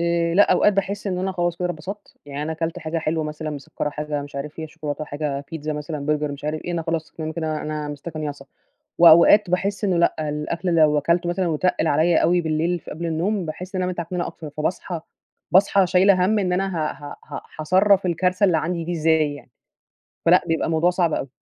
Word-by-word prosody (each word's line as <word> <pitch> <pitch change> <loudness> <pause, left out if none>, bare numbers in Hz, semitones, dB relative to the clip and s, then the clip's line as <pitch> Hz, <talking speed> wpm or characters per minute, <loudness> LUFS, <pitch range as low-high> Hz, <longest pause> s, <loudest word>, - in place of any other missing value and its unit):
آآ 170 0 +1
لأ، 205 - +5
أوقات 210 - +4
باحس 200 +1 -2
إن 180 -2 -1
أنا 190 +1 -1
خلاص 175 -2 -1
كده 180 - -4
أنا 175 - -1
اتبسطت، 190 +7 -9
يعني 145 +1 -5
أنا 160 +1 -2
كلت 165 +1 -3
حاجة 160 +1 -3
حلوة 160 0 -1
مثلًا 155 +1 -5
مسكّرة، 145 0 -4
حاجة 150 -1 -3
مش 140 -1 -10
عارف 150 +2 -5
فيها 160 -1 -6
شوكولاتة، 150 0 -5
حاجة 145 -1 -4
pizza 155 -1 -6
مثلًا 150 -1 -4
burger 150 -1 0
مش 140 +1 -10
عارف 155 +1 -2
إيه، 175 - -3
أنا 170 - -1
خلاص 165 -1 -3
تمام 160 -1 -5
كده 160 -2 -2
أنا 150 -1 -4
مِستَكَنيَصة. 145 -1 -6 0.5
وأوقات 170 +4 +7
باحس 195 +2 -1
إنه 185 -3 +2
لأ، 155 -2 +1
الأكل 165 +4 -2
لو 150 -2 +4
أكلته 170 +3 +1
مثلًا 180 +1 0
وتقِّل 165 +1 0
عليّا 160 +3 +3
أوي 175 +1 +3
بالليل 165 +2 0
في - - -11
قبل 170 +2 -4
النوم، 175 +3 -1
باحس 180 +5 -7
إن 185 - 0
أنا 180 - 0
متعكننة 175 +1 -3
أكتر، 155 -2 -8
فباصحى 160 +3 -3 0.5
باصحى 195 0 +4
شايلة 185 +1 +4
هَم 215 +2 +2
إن 185 -3 0
أنا 190 0 -1
ه 155 -1 -1
ه 145 -1 -10 0.2
ه - - -5 0.2
هاصرّف 190 +4 +3
الكارثة 180 +3 +1
اللي 170 -3 +3
عندي 170 0 -2
دي 175 - -3
إزاي 160 -2 +2
يعني، 145 - -13 0.8
فلأ 175 +2 +5
بيبقى 165 0 0
الموضوع 165 +2 +2
صعب 175 -3 +1
أوي. 135 - -3
165 Hz, 215 wpm, -22 LUFS, 150-180 Hz, 0.8 s, وأوقات